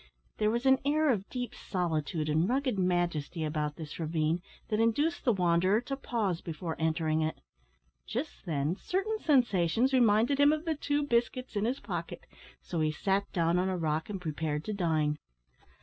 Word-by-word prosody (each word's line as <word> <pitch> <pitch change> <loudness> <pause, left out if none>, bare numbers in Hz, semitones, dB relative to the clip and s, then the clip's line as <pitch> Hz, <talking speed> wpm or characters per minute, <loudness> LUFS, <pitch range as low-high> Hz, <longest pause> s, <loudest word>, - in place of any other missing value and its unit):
There 210 - +3
was 235 +3 -1
an 265 0 +5
air 300 +1 +3
of 200 -4 -2
deep 245 -1 -4
solitude 160 -4 -2
and 160 +5 +2
rugged 255 -4 0
majesty 175 -3 0
about 150 -1 -2
this 155 0 -8
ravine 160 +1 0 0.3
that 215 - 0
induced 290 +10 +1
the 245 - +5
wanderer 185 +1 +3
to 275 +2 -4
pause 215 -10 -2
before 165 0 -5
entering 160 -1 +1
it. 155 0 -2 0.7
Just 250 -3 -5
then, 150 +1 0
certain 395 - -2
sensations 240 - +2
reminded 240 +2 +4
him 285 +1 +6
of 310 +1 -1
the 325 - +1
two 290 0 -1
biscuits 250 -1 0
in 205 +1 +1
his 255 +4 -1
pocket, - - -5 0.4
so 170 - -3
he 155 0 +2
sat 195 +5 0
down 170 0 +2
on 185 +1 +1
a 185 - -1
rock 160 0 -1
and 200 -2 -4
prepared 155 -2 -2
to 215 - -2
dine. 155 -6 0
185 Hz, 175 wpm, -30 LUFS, 160-250 Hz, 0.7 s, him